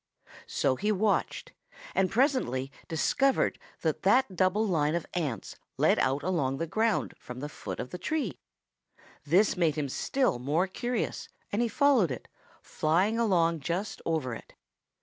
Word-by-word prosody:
So 130 -2 +1
he 210 +2 0
watched 210 +1 0 0.4
and 185 - +2
presently 220 - +1 0.2
discovered 265 - +1 0.2
that - - -1
that 255 -7 +3
double 185 +5 +2
line 160 -5 +1
of 170 - -2
ants 145 - -3 0.2
led - - +3
out 135 +2 +1
along 145 -7 0
the 165 - -1
ground 220 +6 0
from 125 0 -8
the 145 - -4
foot 150 - -7
of 125 - -5
the 180 - -6
tree. 315 - -2 0.9
This 185 +8 +4
made 165 -5 +2
him 145 -3 -2
still 255 - 0
more 150 +8 +1
curious 240 +5 -3 0.2
and 205 - 0
he 240 - +2
followed 265 - +3
it, 125 - -6 0.4
flying 185 +9 +1
along 170 -7 +2
just 175 +8 -3
over 155 -7 -1
it. 115 - -10
180 Hz, 150 wpm, -29 LUFS, 145-220 Hz, 0.9 s, This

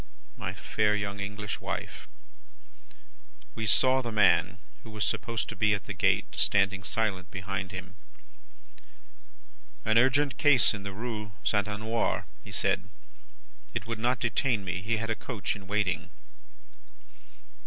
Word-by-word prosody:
My - - -4
fair 105 0 +1
young 100 -1 -3
English 105 +1 -4
wife! - - -5 1.5
we 110 -1 -3
saw 130 +4 +4
the 120 -2 -4
man, 95 -3 +4 0.3
who 115 - -11
was 105 -1 -1
supposed 115 -3 -1
to - - -5
be 105 -1 +3
at 100 - -7
the 100 - -4
gate, 90 - +2
standing 100 -1 +3
silent 95 -3 -1
behind 95 0 -4
him. 95 0 -7 1.9
"An 110 +1 +5
urgent 135 +3 +3
case 145 -6 +5
in 105 - -5
the 100 0 -5
Rue 105 -1 -5
St. 105 0 +1
Honore, 110 +2 -1 0.2
he - - -11
said. 100 0 0 0.9
It 115 -2 -2
would 115 -1 -4
not 125 +1 +1
detain 120 -2 +1
me, 95 +1 -2
he 115 +4 0
had 115 +1 -2
a - - +1
coach 110 -4 -3
in 95 -2 -11
waiting. 100 -2 0
105 Hz, 145 wpm, -29 LUFS, 100-115 Hz, 1.9 s, An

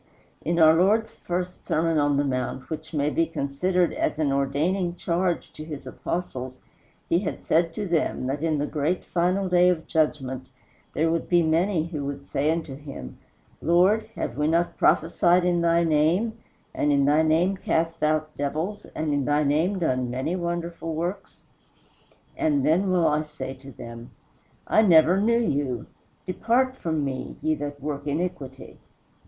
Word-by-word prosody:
In 170 +1 -1
our 160 -1 +7
Lord's 205 +7 +3
first 180 +1 -4
Sermon 165 0 +1
on 145 -1 +2
the 145 - +2
Mount, 130 +1 -3
which 160 0 -6
may 150 -1 0
be 165 +1 +1
considered 170 +5 0
as - - -1
an 150 -3 +1
ordaining 155 +7 0
charge 175 0 -1
to 155 - -8
his 150 -4 -8
Apostles, 130 -3 -5 0.5
he 170 - +3
had 190 - -5
said 165 +1 +2
to 210 -2 -3
them 165 -6 0
that 135 +3 -2
in 160 -2 +1
the 145 - 0
great 155 +4 -1
final 185 +3 0
day 180 0 +5
of 170 -3 -1
Judgment 130 -5 -1 0.5
there 160 +1 +2
would 165 -1 -2
be 175 -1 +4
many 165 +1 +1
who 155 -4 -5
would 140 0 -5
say 145 +1 0
unto 160 -4 -3
him, 140 - -9 0.4
"Lord, 185 +7 +3
have 120 - -4
we 150 - +2
not 170 +2 +1
prophesied 175 +2 +3
in 175 -1 +2
thy 170 0 +3
name, 165 +8 +2 0.4
and 145 - +1
in 140 -1 +3
thy 150 +2 +4
name 165 +5 +2
cast 165 -2 -1
out 155 0 0
devils, 160 +9 -3
and 155 -1 -1
in 145 -1 +1
thy 145 +2 +2
name 160 +7 +1
done 130 -8 0
many 130 +8 -2
wonderful 170 -2 -3
works? 180 +5 -5 0.9
and 300 -4 +1
then 185 +5 +2
will 180 -2 +2
I 150 +1 +2
say 150 -4 -6
to 135 0 -11
them, 115 -1 -10 0.6
I - - +4
never 180 -1 +5
knew 230 +2 +3
you; 140 - -1 0.4
depart 245 +7 +1
from 160 - -2
me, 130 -1 -5
ye 155 - +2
that 145 -1 -5
work 145 0 -5
iniquity." 145 -4 -4
160 Hz, 170 wpm, -25 LUFS, 145-180 Hz, 0.9 s, our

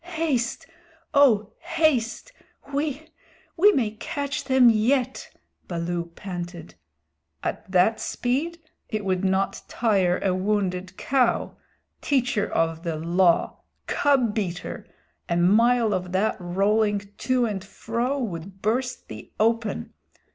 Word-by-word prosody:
"Haste! 275 -8 -1 0.5
O 225 -8 +4
haste! 305 - 0 0.4
We 290 +1 -2 0.5
we 405 +5 +6
may 235 - +1
catch 285 +5 -4
them 260 -2 +5
yet!" 245 +3 +2 0.4
Baloo 170 0 -2
panted. 175 -3 -7 0.7
"At - - -4
that 190 +5 +3
speed! 290 +8 -1 0.3
It 215 -2 -3
would 185 0 0
not 190 0 0
tire 195 -6 +1
a 190 - +2
wounded 185 -1 -1
cow. 255 -3 +1 0.5
Teacher 245 -7 +1
of 165 0 0
the 165 -2 -3
Law 170 +2 +2 0.3
cub 265 -6 +2
beater 180 -5 -4 0.4
a 170 - +1
mile 225 +5 +4
of 180 -1 -3
that 200 +4 +1
rolling 200 +3 +1
to 255 -2 +2
and 200 -4 -3
fro 235 +6 -2
would 190 -5 -5
burst 250 +4 -1
thee - - -10
open. 225 0 0
215 Hz, 115 wpm, -25 LUFS, 185-250 Hz, 0.7 s, we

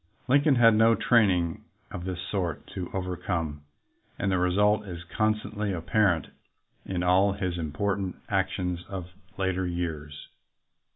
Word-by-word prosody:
Lincoln 140 +2 +4
had 115 -2 +6
no 110 +1 +5
training 95 -10 +2 0.3
of 90 0 -6
this 90 -2 -4
sort 90 -4 -3
to 90 -2 -4
over 90 -1 -3
come, 80 -5 -3 0.6
and 100 - 0
the 95 - +2
result 105 +4 +3
is 85 -2 -7
constantly 105 +2 -1
apparent 90 - +1 0.6
in 90 -2 -2
all 95 +2 +4
his 90 -3 -3
important 95 +5 -2
actions 90 -1 -1
of 90 -2 -6 0.3
later 95 -1 0
years. 80 -4 -5
90 Hz, 130 wpm, -27 LUFS, 85-105 Hz, 0.6 s, had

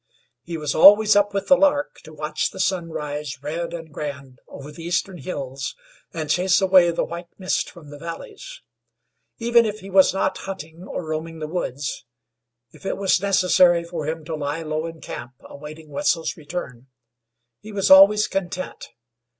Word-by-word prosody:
He 170 +5 -6
was 150 -2 -2
always 210 +5 +7
up 205 0 +3
with 200 0 -2
the 275 - +7
lark 290 0 +1
to 155 - -11
watch 150 0 -2
the 190 - -11
sun 185 -3 0
rise 150 -3 -5
red 170 +3 -3
and 165 -3 -8
grand 140 -4 -7
over 140 +2 -10
the 155 - -11
eastern 175 +2 -2
hills, 135 -5 -5 0.4
and 160 -2 -4
chase 180 +4 +3
away 185 -2 +5
the 170 - 0
white 170 +1 -7
mist 185 -1 -1
from 155 -5 -14
the 145 - -10
valleys. 415 - -9 0.7
Even 235 0 +4
if 215 -1 -4
he 195 +1 -10
was 190 0 +6
not 195 - -1
hunting, 175 -2 -8
or 175 - -5
roaming 160 +1 -4
the 155 - -5
woods, 145 -5 -4 0.7
if - - -18
it 195 - -2
was 190 -2 +2
necessary 180 -3 +4
for 170 -3 -5
him 160 0 -4
to 160 - -5
lie 150 +1 -3
low 155 +1 -3
in 165 -1 -10
camp 125 - -8
awaiting 155 +2 -11
Wetzel's 165 +2 0
return, 145 -6 -7 0.7
he 215 - -11
was 195 -2 0
always 200 +2 +8
content. 185 - -4
170 Hz, 175 wpm, -23 LUFS, 150-195 Hz, 0.7 s, always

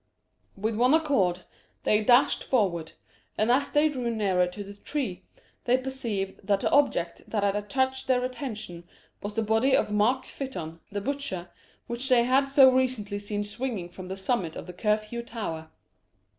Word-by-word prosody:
With 220 +3 -1
one 250 +5 +5
accord 220 - +1 0.4
they 210 0 +3
dashed 245 +4 +4
forward, 180 -10 0 0.4
and 215 +3 +3
as 275 +3 +2
they 295 +1 +4
drew 255 -5 -2
nearer 195 -5 +2
the 200 +2 -7
tree, 200 -4 -4 0.4
they 250 +1 +4
perceived 240 -7 -3
that 200 -2 +2
the - - 0
object 175 -12 +2
that 210 -2 -1
had 200 0 +2
attracted 260 +6 -1
their 250 -1 +2
attention 215 - -6 0.4
was 205 +1 -5
the 225 - +1
body 225 +5 +3
of - - +1
Mark 220 +6 +2
Fytton, 175 - -6
the 205 0 -3
butcher, 205 -9 -4 0.3
which 240 +3 -4
they 245 -2 +5
had 265 +3 +3
so 270 -1 +7
recently 245 -6 0
seen 205 0 -3
swinging 205 -4 -4
from 185 +1 -9
the 190 +1 -5
summit 190 -4 -1
of - - -7
the 180 - -9
Curfew 215 +4 -1
Tower. 205 -9 -5
220 Hz, 165 wpm, -27 LUFS, 195-260 Hz, 0.4 s, so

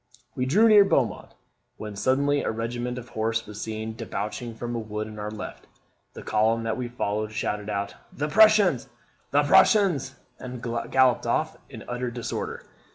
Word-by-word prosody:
We 130 0 -1
drew 210 +12 +5
near 210 -2 +8
Beaumont, 135 - 0 0.4
when 105 -1 -7
suddenly 140 +6 +2
a - - -2
regiment 120 +2 -3
of 120 -1 -8
horse 115 +1 -1
was 105 0 -8
seen 110 0 -4
debouching 110 +2 -5
from 120 +1 -5
a - - -1
wood 110 -1 -4
on 105 -1 -9
our 105 0 -4
left. 105 0 -8 0.5
The - - -9
column 110 +1 +1
that 115 0 -1
we 125 -1 -3
followed 110 -3 -2
shouted 105 0 -3
out, 100 -1 -2 0.2
'The 150 +2 -3
Prussians! 205 - +5 0.4
the 145 +1 +3
Prussians!' 150 - +4 0.2
and 125 -1 -7 0.3
galloped 130 -2 +3
off - - 0
in - - -9
utter 125 0 -3
disorder. 120 0 -5
120 Hz, 165 wpm, -26 LUFS, 110-135 Hz, 0.5 s, near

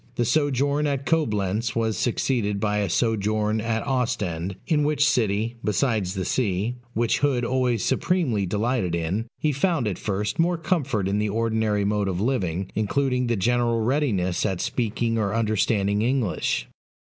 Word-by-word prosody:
The 120 - +1
sojourn 145 +2 +1
at 140 -1 -2
Coblentz 110 - 0
was 110 -2 0
succeeded 115 -4 0
by 105 0 0
a 100 -2 0
sojourn 110 +1 +1
at 115 0 -1
Ostend; 105 -9 -1
in 150 -3 +2
which 145 0 +2
city 115 -3 0
besides 105 -4 0
the 95 -1 -2
sea, 110 0 -1 0.2
which 115 +1 +1
Hood 130 -4 +1
always 125 -3 0
supremely 130 - +1
delighted 105 -2 0
in 90 +8 -2
he 155 - +1
found 145 - +1
at 100 - -3
first 105 +3 -2
more 175 +1 +2
comfort 140 - 0
in 100 +2 0
the 105 0 0
ordinary 110 -1 0
mode 105 -1 0
of 90 -2 -2
living, 95 -6 -1
including 125 +4 0
the 120 - +1
general 120 +2 +1
readiness 110 -9 0
at 95 -2 -1
speaking 115 +1 -1
or 105 0 0
understanding 105 -2 +1
English. 120 -4 0
115 Hz, 155 wpm, -24 LUFS, 100-130 Hz, 0.2 s, in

